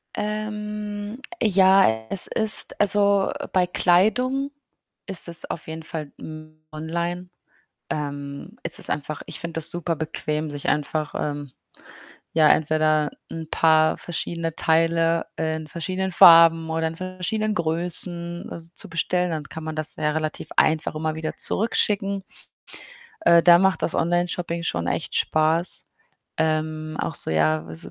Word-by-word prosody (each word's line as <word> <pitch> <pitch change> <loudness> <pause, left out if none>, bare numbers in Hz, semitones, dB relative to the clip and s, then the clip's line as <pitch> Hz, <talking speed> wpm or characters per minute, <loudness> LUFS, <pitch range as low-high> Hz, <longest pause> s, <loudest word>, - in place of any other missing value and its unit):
Ähm, 210 +1 -5 0.2
ja, 190 - +4
es 195 - +3
ist 220 -1 +1
also, 200 -1 +3 0.2
bei 180 -1 +2
Kleidung 250 +11 +2 0.5
ist 190 -2 0
es 170 -1 +1
auf 160 - -6
jeden 160 0 -7
Fall, 155 -3 -6
hm, 155 0 -11
online. 170 +3 -4 0.6
Ähm, 145 +6 -6
ist 170 +1 +2
es - - +3
einfach 150 0 -4
ich - - -6
finde 170 -1 -6
das 165 0 +4
super 170 -1 -1
bequem, 155 0 -3
sich 145 -1 -4
einfach, 150 +1 -2
ähm, 145 -2 -4 0.8
ja, 155 -2 +5
entweder 155 -1 +2 0.2
'n 160 -1 -7
paar 155 -1 +3
verschiedene 165 -1 -4
Teile 165 +1 +1
in 160 -1 -3
verschiedenen 185 +4 -3
Farben 165 -2 +7
oder 160 0 -1
in 160 - -6
verschiedenen 185 +4 -3
Größen 170 +1 0
s 165 +1 -6
zu - - -2
bestellen, 180 +2 -1
dann 155 -2 -3
kann 160 +2 -9
man 155 0 -5
das 155 0 +1
ja 150 - 0
relativ 155 0 -4
einfach 155 0 +2
immer 155 0 -2
wieder 160 0 -5
zurückschicken. 200 -2 +1 1.0
Äh, 170 - +5
da 175 0 +7
macht 190 +1 +1
das - - 0
Onlineshopping 175 0 -1
schon 85 - -2
echt - - -3
Spaß, 160 +3 +1 0.5
ähm, 155 0 -2
auch - - -3
so, - - +1
ja, 80 0 +1
so 80 - -5
165 Hz, 140 wpm, -23 LUFS, 155-185 Hz, 1.0 s, Farben